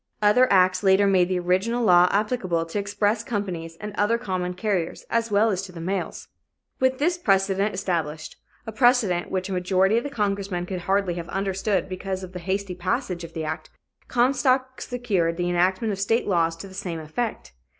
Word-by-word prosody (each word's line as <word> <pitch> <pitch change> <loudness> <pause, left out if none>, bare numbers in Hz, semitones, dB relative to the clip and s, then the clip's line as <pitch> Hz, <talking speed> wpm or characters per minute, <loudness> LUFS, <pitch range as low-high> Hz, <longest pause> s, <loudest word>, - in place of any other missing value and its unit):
Other 215 +5 +4
acts 185 -1 +4
later 195 0 +4
made 185 -2 +3
the 185 - 0
original 190 +7 0
law 180 -3 +6
applicable 200 -6 0
to 165 +5 -3
express 205 +2 0
companies 185 -8 -4
and 210 -1 -6
other 210 +3 +2
common 180 -4 -3
carriers, 185 -4 -2
as 230 0 +1
well 210 +2 +3
as 190 -2 -1
to 195 -1 -9
the 170 - -10
mails. 190 +4 -3 0.5
With 260 0 +2
this 345 +5 +1
precedent 195 - +1
established 160 -5 -3 0.3
a 225 - -5
precedent 220 -7 +2
which 185 0 -2
a 195 - -4
majority 185 +3 +2
of 235 - 0
the 285 - -4
congressmen 200 -7 -2
could 185 0 -4
hardly 195 -2 +2
have 170 -1 -6
understood 195 0 -1
because 190 0 -4
of 185 0 -9
the 180 - -5
hasty 190 +1 -2
passage 185 0 -2
of 165 - -9
the 160 -1 -4
act 155 0 -5 0.4
Comstock 260 0 +1
secured 200 -10 -1
the 175 0 -1
enactment 185 +5 +1
of 195 - -6
state 225 +4 +1
laws 165 -4 +2
to 165 +4 -9
the 190 - -13
same 175 -3 -4
effect. 160 - -4
195 Hz, 190 wpm, -24 LUFS, 180-215 Hz, 0.5 s, law